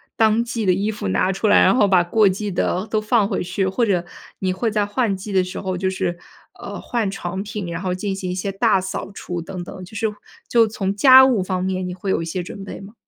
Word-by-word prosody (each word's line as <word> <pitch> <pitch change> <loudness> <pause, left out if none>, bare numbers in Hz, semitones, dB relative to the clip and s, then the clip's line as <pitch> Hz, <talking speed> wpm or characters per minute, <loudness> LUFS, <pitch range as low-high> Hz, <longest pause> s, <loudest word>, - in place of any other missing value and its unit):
当 220 0 +3
季 230 -3 -3
的 185 - +4
衣 200 +3 -1
服 205 - -4
拿 140 - +1
出 195 - -3
来， 205 - +6
然 - - +5
后 230 - +4
把 180 -2 +5
过 205 +3 +4
季 205 +2 -3
的 185 +2 -1
都 215 -1 0
放 215 -1 +2
回 - - -2
去。 185 +2 -1
或 230 +6 +1
者 180 -5 0 0.3
你 185 -1 0
会 225 +4 -1
在 210 -1 +1
换 205 -1 0
季 205 +1 -7
的 190 -1 +3
时 185 - -6
候 185 -1 -3
就 190 +1 0
是， 175 -2 -2 0.4
呃， - - -7
换 225 -5 -2
床 190 0 -4
品， 210 -3 -5
然 170 +1 -4
后 185 -2 -1
进 190 +1 -3
行 185 -2 -4
一 - - -2
些 185 +2 -3
大 205 -1 +3
扫 190 +1 -5
除 175 -3 -5
等 180 +2 -7
等， 185 - -9
就 180 - -13
是 220 - +1 0.4
就 230 -1 +4
从 200 -2 -2
家 260 +3 +8
务 240 -8 +2
方 185 0 -2
面 185 0 -2
你 180 - -4
会 185 +2 -5
有 - - +1
一 - - -4
些 175 +3 -3
准 195 +2 -8
备 195 - -8
吗？ 200 +2 -12
195 Hz, 280 characters per minute, -21 LUFS, 185-215 Hz, 0.4 s, 家